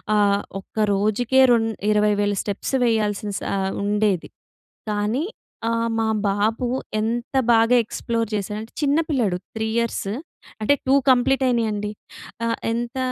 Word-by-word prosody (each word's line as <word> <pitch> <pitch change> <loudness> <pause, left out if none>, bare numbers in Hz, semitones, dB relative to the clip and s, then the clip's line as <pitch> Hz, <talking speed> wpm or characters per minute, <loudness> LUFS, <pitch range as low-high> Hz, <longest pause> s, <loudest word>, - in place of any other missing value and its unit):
ఆహ్, 200 -1 +3 0.2
ఒక్క 215 +2 -1
రోజుకే 220 +6 +2
రెండు 225 -1 +3 0.2
20000 210 -1 +2
స్టెప్స్ 205 +5 -4
వేయాల్సిన 210 -2 0 0.2
ఆహ్, 190 0 -1
ఉండేది. 205 -3 +1 0.6
కానీ 210 +7 0 0.5
ఆహ్, 230 0 0
మా 220 - +1 0.2
బాబు 215 +5 0 0.3
ఎంత 235 +4 -2 0.2
బాగా 230 +2 +4
ఎక్స్‌ప్లోర్ 230 0 -2
చేశాడంటే, 210 +2 -4
చిన్న 285 +1 +3
పిల్లాడు 215 -10 +1 0.2
3 220 0 -1
ఇయర్స్. 235 -4 -1 0.5
అంటే 250 +7 +4
2 270 - +5 0.2
కంప్లీట్ 265 +2 +3
అయినయండి. 215 -4 0 0.5
ఆహ్, 230 0 0
ఎంత 235 +2 -3
220 Hz, 125 wpm, -22 LUFS, 205-235 Hz, 0.6 s, 2